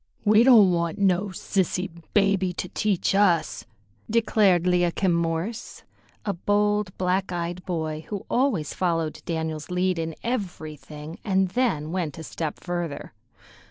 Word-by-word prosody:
"We 215 +1 +6
don't 225 -7 +7
want 170 +1 -1
no 195 -1 +2
sissy 185 -1 -1 0.2
baby 195 -3 +3
to 180 - -4
teach 205 -3 0
us," 180 -5 +2 0.4
declared 210 -6 +3
'Liakim 180 +1 +2
Morse, 170 +6 -3 0.4
a 200 - 0
bold, 205 +1 0
black 185 +1 0
eyed 175 +1 -3
boy, 160 -3 -3
who 205 -2 -5
always 240 - 0
followed 165 -4 -1
Daniel's 160 -1 -3
lead 180 -1 0
in 160 -1 -3
everything 155 - -5
and 190 -2 +1
then 175 -10 0
went 170 -5 -3
a 160 - -7
step 160 -1 -4
further. 175 -5 -4
180 Hz, 130 wpm, -25 LUFS, 165-200 Hz, 0.4 s, don't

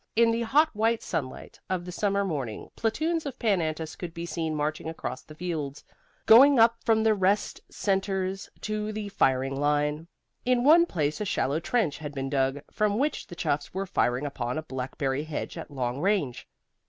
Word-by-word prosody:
In 230 0 +5
the 230 +1 0
hot 290 +5 +3
white 225 +2 +1
sunlight 145 -7 -5
of 185 -2 -2
the 180 - -6
summer 200 +1 0
morning 135 - -4
platoons 310 +8 -1
of 260 -2 -6
Pan 205 -6 +2
Antis 160 0 -3
could 170 -2 -7
be 170 0 -4
seen 160 -1 -2
marching 155 +2 -2
across 130 -5 -5
the 155 - -14
fields, 155 -5 -4 0.4
going 270 +5 +8
up 230 0 +5
from 220 -1 +3
the 220 -1 +4
rest 200 +1 +1
centers 195 -1 -1
to 215 0 -2
the 210 -1 -4
firing 135 -6 +1
line. 150 +2 0 0.4
In 250 -1 +2
one 335 +5 +7
place 155 - -1
a - - +1
shallow 145 -6 0
trench 175 -4 0
had 150 -2 -7
been 135 0 -3
dug, 135 0 +1
from 210 -1 +1
which 290 +5 -1
the 175 - -9
chuffs 145 0 -2
were 195 +1 -1
firing 125 -6 0
upon 125 -2 -3
a 155 - -3
blackberry 135 +1 -3
hedge 155 -2 -5
at - - -7
long 130 -2 -3
range. 175 - 0
170 Hz, 185 wpm, -27 LUFS, 145-215 Hz, 0.4 s, going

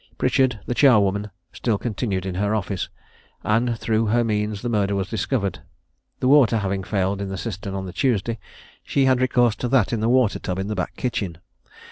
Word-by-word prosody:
Pritchard, 130 -5 +2
the - - -1
charwoman, 105 -6 +4 0.2
still 115 -4 0
continued 100 -4 -2
in 95 - -3
her 100 +3 0
office, 95 -3 -2 0.5
and 115 +3 +1
through 110 0 0
her 120 +3 +3
means 105 -1 -1
the - - -1
murder 100 -3 +1
was 95 -2 -1
discovered. 110 -3 -1 0.6
The 130 - +2
water 135 -5 +5
having 100 -2 -1
failed 100 0 -1
in 100 - -3
the 95 - -4
cistern 95 +2 -5
on 95 -1 -4
the 90 - -7
Tuesday, 115 -3 0 0.4
she 135 - +1
had 130 -1 +3
recourse 125 -3 +3
to 125 - -2
that 120 -4 +2
in 115 - 0
the 110 +2 +1
water 125 -4 +3
tub 90 - -3
in 95 +2 -3
the 105 - -2
back 90 - -3
kitchen. 100 -9 -3
105 Hz, 195 wpm, -23 LUFS, 100-120 Hz, 0.6 s, water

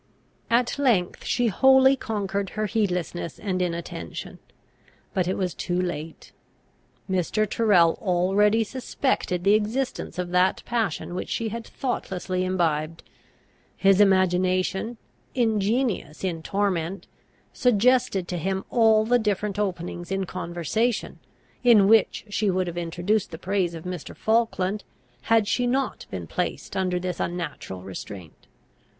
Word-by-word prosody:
At 240 +3 +2
length 225 -11 +1
she 245 - +1
wholly 265 +5 +5
conquered 200 -5 -3
her 215 - +1
heedlessness 180 -6 -2
and 185 -3 -2
inattention. 170 - -5 0.7
But 185 -2 0
it 185 - -1
was 185 -3 -1
too 175 0 -2
late. 165 -3 -5 0.8
Mr. 190 +3 0
Tyrrel 190 -7 +3
already 205 +4 +3
suspected 240 -6 -2
the 200 +2 +5
existence 220 +4 -1
of 180 -1 -3
that 180 +1 +2
passion 220 -8 -2
which 180 - -4
she 230 -1 -1
had 230 +1 -6
thoughtlessly 185 -7 -3
imbibed. 165 -3 -1 0.7
His 195 0 +5
imagination, 185 +3 +2 0.4
ingenious 220 - 0
in 170 -4 -2
torment, 195 -1 -1 0.5
suggested 245 -5 +2
to 180 - -2
him 190 +3 -2
all 220 -2 +4
the 245 +2 +3
different 210 -1 -1
openings 175 -3 -3
in 195 0 0
conversation, 180 +7 -2 0.4
in 225 -5 +6
which 220 0 +3
she 205 0 0
would 185 0 +1
have 175 -1 -5
introduced 175 +5 -1
the 160 - -7
praise 185 -1 -1
of 160 - -8
Mr. 180 -3 -6
Falkland, 215 -3 0 0.5
had 225 -2 +4
she 245 +3 +1
not 260 +1 -1
been 90 -3 -5
placed - - -3
under 185 -1 0
this 180 -1 -4
unnatural 155 - -4
restraint. 95 -3 -9
190 Hz, 130 wpm, -25 LUFS, 175-220 Hz, 0.8 s, in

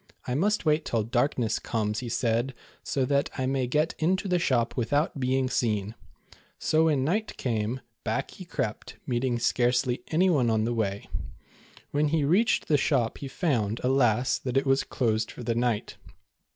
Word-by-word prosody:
" - - -24
I 125 - -1
must 205 +8 +1
wait 155 0 +3
till 115 -2 0
darkness 120 0 0
comes," 110 -2 -2
he 125 - -5
said, 120 +2 0 0.3
"so 135 -2 -1
that 140 +1 +1
I 130 - 0
may 130 -1 0
get 150 +6 +1
into 185 +5 +1
the 180 -1 +2
shop 125 -8 +1
without 145 +5 0
being 130 0 +1
seen." 110 -4 0 0.6
So 160 +1 +2
when 145 -5 +2
night 210 +9 -1
came, 115 +1 -2 0.2
back - - -2
he - - -10
crept, - - -4
meeting 120 0 0
scarcely 125 +1 +1
anyone 160 -7 +3
on 110 -1 +2
the 120 +2 0
way. 100 -3 -2 0.8
When 150 +1 +2
he 155 0 +1
reached 190 +10 +2
the 150 - +4
shop, 130 -5 +1
he 140 - -5
found, 120 - 0
alas, 125 -2 +2
that 125 0 -2
it 135 - +2
was 135 0 +3
closed 110 -3 0
for - - -9
the 115 0 0
night. 120 -2 -1
130 Hz, 175 wpm, -27 LUFS, 115-145 Hz, 0.8 s, the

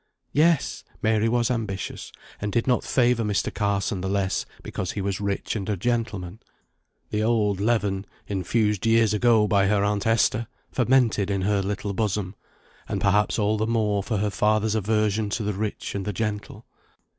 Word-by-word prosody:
Yes! 160 +2 +2 0.2
Mary 110 0 +2
was 120 +1 +1
ambitious, 105 -5 -4 0.3
and 105 0 -2
did 115 +3 +1
not 125 -2 +2
favour 120 -2 +2
Mr. 105 -2 -1
Carson 100 -2 -1
the 95 - -2
less 95 -1 0 0.2
because 95 - -4
he - - -4
was 100 0 -2
rich 100 +1 -2
and 100 -2 -3
a 105 - 0
gentleman. 110 -3 -2 0.7
The 105 - 0
old 110 -3 +1
leaven, 100 -3 0 0.2
infused 105 +2 0
years 115 -1 +4
ago 110 0 +4
by 100 -2 +3
her 100 0 +2
aunt 105 +1 0
Esther, 115 0 +2 0.2
fermented 120 -5 +2
in 100 -2 0
her 100 0 +2
little 100 +1 -3
bosom, 100 -2 -1 0.6
and - - -1
perhaps 105 +1 +2
all 105 0 +1
the 110 +1 0
more, 105 -3 +1
for 105 +2 -2
her 105 +1 0
father's 110 +1 +2
aversion 110 0 +1
to 110 +2 -2
the 105 0 -1
rich 105 +2 -4
and 100 - -3
the 105 - -3
gentle. 105 0 -4
105 Hz, 170 wpm, -25 LUFS, 100-115 Hz, 0.7 s, years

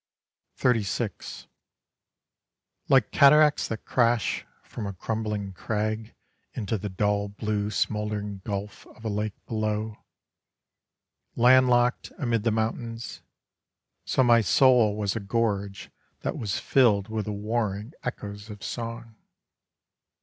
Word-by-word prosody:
XXXVI 115 -7 -1 1.4
Like 130 -4 +4
cataracts 150 +1 +5
that 115 - -6
crash 120 -4 +1 0.2
from 110 -4 -6
a 100 - -4
crumbling 105 0 -3
crag 110 +3 -3 0.4
Into 110 -1 -2
the 105 - -4
dull 100 +2 0
blue 105 0 -2
smouldering 105 -2 -2
gulf 100 0 -5
of 115 - -15
a - - 0
lake 105 0 -2
below, 110 -1 -2 1.4
Landlocked 125 0 +4
amid 120 -5 0
the 115 - +1
mountains, 115 +1 -3 0.8
so 130 - +2
my 120 -1 +5
soul 115 -1 +4
Was 100 -2 -1
a - - -1
gorge 100 -2 -2 0.3
that - - -2
was 105 -4 -2
filled 110 -7 +3
with 110 -1 -3
the 105 - -3
warring 105 +2 -2
echoes 105 -3 -6
of 105 -1 -9
song. 115 -1 -6
110 Hz, 115 wpm, -26 LUFS, 105-115 Hz, 1.4 s, cataracts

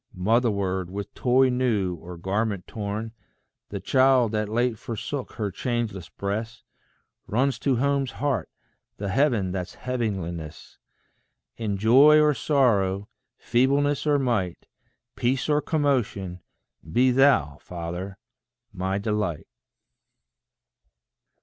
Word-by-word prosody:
Motherward, 100 -3 +1
with 100 +2 -6
toy 130 +1 +3
new, 115 -8 +1
or 85 +1 -9
garment 100 +1 -2
torn, 110 +1 -4 0.6
The - - -4
child 130 -3 +3
that 105 -1 -1
late 120 0 0
forsook 125 +4 -5
her 105 -3 -3
changeless 115 -4 -3
breast, 110 +4 -4 0.6
Runs 130 +2 +1
to 135 0 +1
home's 140 +1 0
heart, 140 -4 -1 0.5
the 100 -1 -3
heaven 115 -5 +2
that's 90 -1 -5
heavenliest: 95 -11 -4 0.8
In 105 -3 -2
joy 135 +9 +7
or 150 0 +4
sorrow, 105 -10 +1 0.3
feebleness 140 +4 +1
or 145 -1 +4
might, 115 -10 -1 0.5
Peace 130 +2 0
or 150 0 +2
commotion, 120 - -1 0.5
be 125 +7 +4
thou, 125 - +3
Father, 90 +2 -6 0.6
my 95 +1 -2
delight. 105 -6 -2
110 Hz, 105 wpm, -25 LUFS, 95-130 Hz, 0.8 s, joy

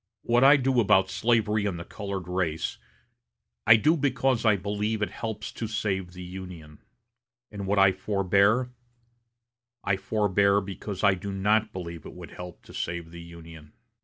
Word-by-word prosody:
What 120 +2 +3
I 140 +2 +8
do 130 -2 +1
about 95 -3 +3
slavery 110 -3 +1
and 90 -4 -3
the 85 - -7
colored 100 -4 -6
race, 90 -3 -2 0.9
I 110 - +9
do 150 +9 +3
because 135 -4 0
I 110 -2 +5
believe 105 +2 -2
it - - -2
helps 110 -1 -5
to 115 - -5
save 95 -5 -2
the 90 0 -9
Union; 90 -4 -10 0.7
and 100 -2 -6
what 100 +1 +1
I 95 -1 +6
forbear, 100 +5 +1 1.1
I 95 -1 +1
forbear 100 0 +2
because 100 0 -6
I 100 -2 +5
do 100 +2 -5
not 105 +3 +1
believe 85 -3 -7
it - - -10
would - - -10
help 90 -1 -10
to - - -15
save 85 -1 -4
the 85 0 -10
Union. 80 -2 -13
100 Hz, 165 wpm, -26 LUFS, 90-110 Hz, 1.1 s, I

